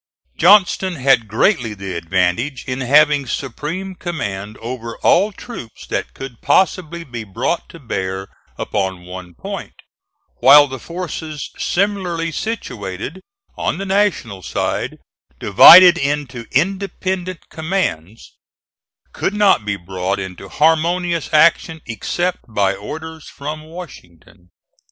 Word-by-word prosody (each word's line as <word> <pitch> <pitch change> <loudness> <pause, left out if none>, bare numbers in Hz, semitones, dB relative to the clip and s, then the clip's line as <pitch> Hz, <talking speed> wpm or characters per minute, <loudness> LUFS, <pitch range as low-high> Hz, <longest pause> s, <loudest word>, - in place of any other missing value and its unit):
Johnston 185 0 +4
had 130 -5 +3
greatly 115 - +1
the 100 -1 -6
advantage 90 - -1
in 130 +1 -3
having 145 +1 +4
supreme 155 +10 -4
command 105 - -5
over 115 0 -6
all 200 +5 +4
troops 190 - -10
that - - -4
could 135 -3 -9
possibly 170 -3 +1
be 120 -6 -7
brought 115 - -3
to - - -12
bear 95 - -4 0.3
upon 95 -3 -3
one 90 -1 -9
point, - - -7 0.6
while 145 +4 +8
the 130 -2 -7
forces 160 -3 -6
similarly 180 -4 -1
situated 130 - -5 0.3
on - - -2
the 195 - -4
National 190 - 0
side, - - -3 0.4
divided 175 - +9
into 140 -4 -3
independent 185 +2 -2
commands, 155 - -3 0.7
could 205 - -2
not 205 - +3
be 105 -1 -1
brought 95 +1 -3
into 95 0 -7
harmonious 165 - +1
action 160 +1 +3
except 175 - -2
by 100 -3 +1
orders 160 +10 -8
from 150 +2 -6
Washington. 100 - -13
140 Hz, 115 wpm, -18 LUFS, -, 0.7 s, divided